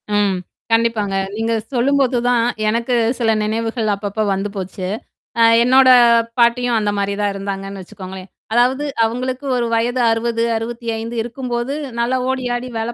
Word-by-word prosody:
ம். 200 -2 +2 0.4
கண்டிப்பாங்க. 225 -4 +1 0.2
நீங்கச் 225 0 -2
சொல்லும்போதுதான் 245 -2 +2 0.2
எனக்குச் 235 +1 +1
சில 225 -1 +2
நினைவுகள் 225 0 -1
அப்பப்ப 205 +2 -4
வந்து 195 +2 -2
போச்சு. 185 0 -5 0.5
ஆ, - - +4 0.2
என்னோட 260 +1 +5 0.5
பாட்டியும் 235 0 +3
அந்த 205 -1 0
மாதிரிதான் 200 0 -1
இருந்தாங்கன்னு 195 0 -5
வச்சுக்கோங்களேன். 185 +1 -10 0.2
அதாவது 255 +4 +2 0.2
அவங்களுக்கு 255 +4 -2
ஒரு 240 -1 0
வயது 240 +2 +1
60, 230 0 0
65 230 0 -4
இருக்கும்போது 240 +1 -4 0.3
நல்ல 240 +2 0 0.2
ஓடியாடி 250 -1 -2
வேலை 230 +2 -3
230 Hz, 125 wpm, -19 LUFS, 210-245 Hz, 0.5 s, என்னோட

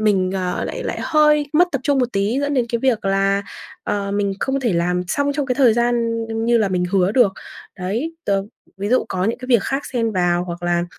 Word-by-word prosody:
mình, 195 -4 +2
ờ, 180 -1 -2
lại - - -5
lại - - -3
hơi 300 -1 +3
mất 350 +3 +4
tập 275 - -1
trung 285 -2 +2
một 245 -1 0
tí 205 +7 0
dẫn 285 0 -1
đến 250 -3 +2
cái 235 - -1
việc 235 -4 0
là, 195 +1 +1 0.4
ờ, 200 -1 -2
mình 200 -1 0
không 270 0 0
thể 235 -5 0
làm 180 +1 0
xong 285 +5 0
trong 285 -2 -2
cái 250 - 0
thời 245 -5 +4
gian 240 0 +2 0.5
như 235 0 +3
là 210 -3 +2
mình 180 -1 0
hứa 190 +1 +2
được. 230 -6 +4 0.5
Đấy, 230 - -3
tớ 195 -1 +1 0.3
ví 200 +1 -3
dụ 255 +3 +2
có 185 0 -1
những 225 - -1
cái 255 - -8
việc 235 -6 +4
khác 270 +1 -2
xen 230 -3 0
vào 175 -1 +1
hoặc 175 -1 -7
là 175 0 +1
220 Hz, 235 wpm, -20 LUFS, 190-265 Hz, 0.5 s, mất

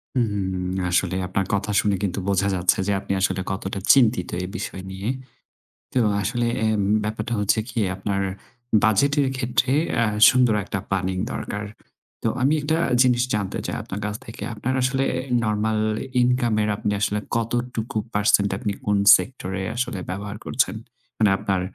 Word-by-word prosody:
উহু। 110 -5 +1 0.5
আসলে 90 +1 +1
আপনার 95 +1 -1
কথা 100 +1 0
শুনে 100 -2 +1
কিন্তু 95 0 -1
বোঝা 100 0 +2
যাচ্ছে 90 0 +2
যে - - +2
আপনি 100 - -3
আসলে 95 -1 +1
কতটা 95 +1 -4
চিন্তিত 115 -8 +3
এই - - -4
বিষয় 95 - -5
নিয়ে। 95 +2 -5 0.9
তো 130 - +2 0.2
আসলে 120 +4 -1 0.2
এ - - +3 0.4
ব্যাপারটা 110 +2 -3
হচ্ছে 105 +1 +2
কি 115 - -3 0.2
আপনার 100 0 -2 0.6
বাজেটের 140 +6 +3
ক্ষেত্রে 130 0 0 0.3
আ - - +3 0.2
সুন্দর 125 -3 +3
একটা 95 - -4
প্ল্যানিং 95 -1 -1 0.2
দরকার। 105 0 -4 0.6
তো - - +1
আমি 135 +4 +3
একটা 160 +2 0 0.2
জিনিস 125 -1 +4
জানতে 100 -3 -2
চাই - - -3
আপনার 95 - -6
কাছ 105 0 -3
থেকে। 115 - -8
আপনার 120 +4 -2
আসলে 135 +1 +1 0.4
নরমাল 110 0 0 0.4
ইনকামের 120 -4 +2
আপনি 105 - -1
আসলে 105 0 +1 0.2
কতটুকু 115 0 -2 0.2
পারসেন্ট 100 -1 +3
আপনি 110 -4 -2
কোন 105 0 +2 0.2
সেক্টরে 95 -7 -5
আসলে 120 -5 -2
ব্যবহার 100 +2 -5
করছেন? 115 -2 +1 0.4
মানে 105 -2 +4
আপনার 95 -2 -1
105 Hz, 150 wpm, -23 LUFS, 100-120 Hz, 0.9 s, জিনিস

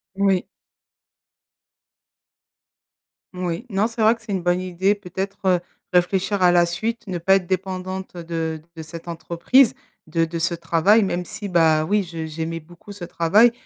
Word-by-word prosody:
Oui. 195 -2 +2 2.9
Oui. 180 +3 -3
Non, 205 +1 +1
c'est 230 -1 -5
vrai 220 +1 +6
que 230 - -22
c'est 215 -2 -5
une 190 - -1
bonne 175 +1 +2
idée 185 +2 +1
peut-être, 195 0 -5
heu, 180 -2 +4 0.3
réfléchir 190 +3 +2
à 180 -1 +6
la 175 -1 +5
suite, 220 +7 -3
ne 185 -2 -3
pas 190 +3 +4
être 185 -2 0
dépendante, 185 0 -3
heu, 170 - -6
de 160 -1 -3
de 160 - -7
cette 165 +2 -10
entreprise, 170 +9 +3 0.3
de 165 +1 +1
de 165 +1 -5
ce 170 +1 0
travail, 170 +6 +3
même 180 -2 -1
si, 215 +2 -7
bah, 160 -4 +3
oui, 205 +4 +2
je 165 -3 -6
j'aimais 160 +1 -4
beaucoup 175 +5 -14
ce 195 -3 -7
travail, 185 +8 +4
180 Hz, 165 wpm, -22 LUFS, 170-195 Hz, 2.9 s, vrai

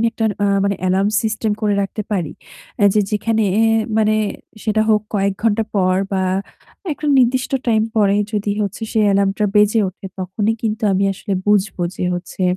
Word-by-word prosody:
আমি 230 - +2
একটা 225 - -2 0.2
আ - - +3 0.2
মানে 200 -1 0
অ্যালার্ম 190 +2 +2
সিস্টেম 220 -1 -1
করে 210 -1 +1
রাখতে 205 +2 -4
পারি, 175 -7 -1 0.5
অ্যা 205 - +5
যে 210 - +4
যেখানে 220 +1 0
অ্যা 220 - +3 0.4
মানে 215 0 +3 0.5
সেটা 215 0 +1
হোক 215 -1 +4
কয়েক 200 0 +1
ঘণ্টা 225 0 +2
পর 185 -1 +2 0.2
বা 190 - +1 0.7
একটা 300 +1 -6
নির্দিষ্ট 255 +1 +2
টাইম 220 -2 +3
পরে 200 -1 +3 0.2
যদি 210 -1 -1
হচ্ছে 200 +3 -4
সেই 220 -1 +2
অ্যালার্মটা 200 +1 +1
বেজে 210 +2 +4
ওঠে 195 +1 -10
তখনই 205 +4 -1
কিন্তু 220 -1 -2
আমি 195 +1 +1
আসলে 200 +2 -6
বুঝবো 205 -3 +1
যে, - - -2
হচ্ছে 175 +1 -6
210 Hz, 175 wpm, -19 LUFS, 195-220 Hz, 0.7 s, অ্যা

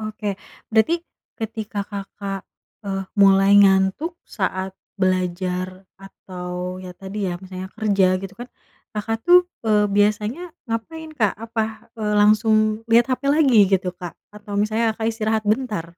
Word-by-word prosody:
Oke, 215 -1 -4 0.4
berarti, 330 +11 +2 0.3
ketika 220 -2 -4
Kakak, 200 -1 -6 0.4
eee, 195 -1 -3
mulai 195 -1 +5
ngantuk 195 - +3
saat 190 -2 -3 0.3
belajar 185 0 -1 0.2
atau 180 -1 -7
ya, 185 - -8
tadi, 195 0 -4
ya, 175 - -3
misalnya 185 0 -8
kerja 195 -4 +3
gitu 195 +1 -8
kan, 245 +4 -9 0.5
Kakak 225 +2 -2
tuh, 360 0 +6 0.2
eee, 210 -2 +3
biasanya, 210 - +1 0.3
ngapain 315 +8 -5
Kak? 215 -8 +1
Apa, 220 0 -4
eee, 215 -2 -2
langsung, 215 +1 +4
lihat 235 +1 +6
HP 255 - -2
lagi 285 -6 +4
gitu 185 -2 +1
Kak? 175 -1 -8 0.2
Atau 205 -1 -7
misalnya 220 +2 +1
Kakak 220 - -2
istirahat 220 -1 -1
bentar? 215 -5 0
210 Hz, 135 wpm, -22 LUFS, 190-225 Hz, 0.5 s, tuh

